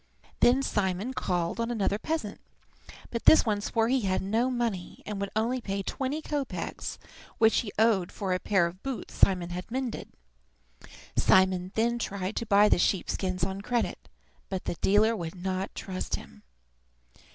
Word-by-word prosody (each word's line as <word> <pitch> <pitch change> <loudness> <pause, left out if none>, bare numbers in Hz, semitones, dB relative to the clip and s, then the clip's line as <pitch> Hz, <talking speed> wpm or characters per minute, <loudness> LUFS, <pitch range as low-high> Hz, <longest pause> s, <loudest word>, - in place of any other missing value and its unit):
Then 260 +3 +5
Simon 200 +2 -1
called 175 -2 -1
on 230 0 0
another 210 -3 0
peasant, 310 -10 -3 0.7
but 235 - -4
this 315 - +8
one 210 -2 0
swore 225 +2 +1
he 260 +1 +2
had 190 -3 0
no 225 +6 +1
money, 230 -8 -3
and 210 -1 -4
would 200 - -2
only 240 +4 0
pay 195 -2 -3
twenty 280 +8 -3
kopeks 290 -3 -4 0.4
which 225 0 +4
he 210 - -4
owed 215 -5 +3
for 195 -3 -2
a 180 - 0
pair 190 -3 +2
of 175 +3 -6
boots 270 -3 -5
Simon 180 -3 +3
had 180 +1 -5
mended. 255 -1 -4 1.0
Simon 185 -1 +3
then 235 +2 +1
tried 195 -2 -3
to 230 - -2
buy 205 +1 +6
the 210 - +3
sheep 190 +1 +1
skins 185 -2 -2
on 190 +2 -2
credit, 240 +2 -2 0.4
but 190 -2 -4
the - - -1
dealer 215 +3 +4
would 170 -3 -5
not 185 +1 -3
trust 185 -1 -3
him. 70 0 -12
205 Hz, 165 wpm, -28 LUFS, 185-235 Hz, 1.0 s, this